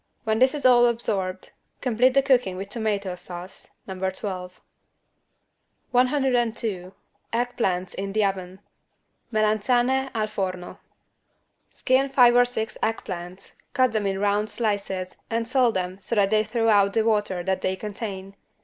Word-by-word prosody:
When 220 0 0
this 260 +3 +4
is 290 - -5
all 240 -1 +7
absorbed, 195 -6 -2 0.3
complete 250 +1 +2
the 275 - +5
cooking 250 -9 +2
with 195 +1 -6
tomato 205 -4 -2
sauce 180 +1 -10 0.2
(No. 190 -1 -7
12). 185 -1 -6 1.3
102 240 -7 0 0.4
EGG 245 +1 -1
PLANTS 185 -5 -1
IN 195 0 -4
THE 215 0 +2
OVEN 190 -1 -4 0.7
(Melanzane 240 +5 +2
al 215 -1 +1
forno) 185 -4 -4 0.9
Skin 265 +1 +1
five 245 -3 +5
or 245 0 +6
six 225 -3 -4
egg 225 0 -1
plants, 180 +1 -8 0.2
cut 255 -1 +3
them 215 -2 -1
in 195 0 -1
round 205 +1 +1
slices 200 -4 -3
and 230 0 -1
salt 250 -3 +2
them 185 +1 -3
so 235 - -3
that 200 -1 +3
they 215 0 +3
throw 225 +1 0
out 200 -2 +4
the 220 -1 +2
water 210 -5 +1
that 190 +1 -1
they 185 - 0
contain. 195 -1 -6
215 Hz, 150 wpm, -24 LUFS, 190-240 Hz, 1.3 s, all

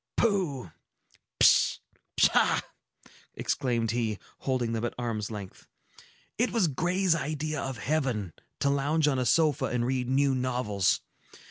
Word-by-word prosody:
"Pooh! 170 - 0 0.7
Pish! - - +5 0.4
Pshaw!" - - +4 0.7
exclaimed 115 -3 -1
he, 115 -3 -1 0.2
holding 125 -3 -1
them 115 0 -2
at 120 - -2
arm's 115 -4 -3
length. 100 -4 -9 0.7
"It 245 - +2
was 220 -7 +2
Gray's 175 +5 +1
idea 155 0 -2
of 135 -2 -4
heaven, 125 - -1 0.3
to 140 - +3
lounge 145 +3 +1
on 135 -3 +1
a 125 - 0
sofa 155 -2 +3
and 120 -1 -1
read 125 -1 -1
new 135 +1 +3
novels. 125 -7 0
130 Hz, 130 wpm, -28 LUFS, 115-155 Hz, 0.7 s, Pish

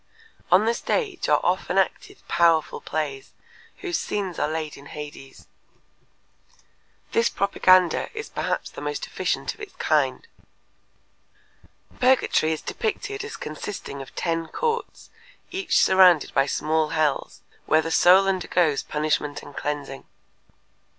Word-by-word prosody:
On 185 +4 +6
the 230 - +2
stage 395 - -2
are - - +5
often - - 0
acted 400 -1 -1
powerful 165 -2 +2
plays 145 -3 -4 0.5
whose 350 -3 -1
scenes 195 -5 -3
are - - +1
laid 155 -1 -4
in 140 +1 -13
Hades. 145 -3 -10 1.7
This 230 - +2
propaganda 185 -2 +3
is 435 - -4
perhaps - - -3
the - - -9
most 445 +3 -3
efficient - - -2
of - - -17
its 415 -2 -9
kind. - - 0 1.7
Purgatory 255 -10 +3
is 160 - -3
depicted 415 -2 -3
as 440 - -7
consisting 155 -2 -6
of 135 - -12
ten 165 -1 -1
courts 470 - -3 0.4
each 370 -1 +1
surrounded 185 -5 +5
by 135 +1 +3
small 155 +1 0
hells, 155 -3 -1 0.2
where 155 0 +4
the 165 - -4
soul 185 +4 +6
undergoes 175 -5 +1
punishment 150 -1 -2
and 140 - -12
cleansing. 145 -2 -4
170 Hz, 125 wpm, -24 LUFS, 150-250 Hz, 1.7 s, On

